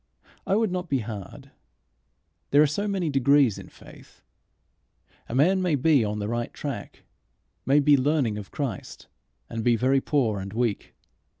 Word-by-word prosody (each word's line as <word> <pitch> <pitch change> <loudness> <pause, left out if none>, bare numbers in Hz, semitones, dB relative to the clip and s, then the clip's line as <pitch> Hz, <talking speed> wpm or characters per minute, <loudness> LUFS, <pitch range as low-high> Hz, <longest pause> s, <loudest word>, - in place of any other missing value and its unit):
I 195 - +2
would 220 -2 +1
not 180 -1 -4
be 135 -3 0
hard. 105 -3 -9 1.0
There 145 +2 +5
are - - +5
so 175 +9 -2
many 190 -6 -1
degrees 135 -4 +3
in - - -11
faith! - - -17 1.1
A 115 - -4
man 185 +8 +3
may 180 -4 +1
be 145 -2 +3
on 105 0 -2
the 105 0 -3
right 120 +1 -3
track, - - -7 0.6
may 140 +2 +5
be 145 0 +5
learning 130 -6 0
of 100 - -10
Christ, 130 -10 -5 0.4
and 115 -1 -5
be 120 0 +3
very 130 +3 +2
poor 120 -10 0
and 95 +1 -7
weak. 115 -2 -2
135 Hz, 165 wpm, -25 LUFS, 115-150 Hz, 1.1 s, There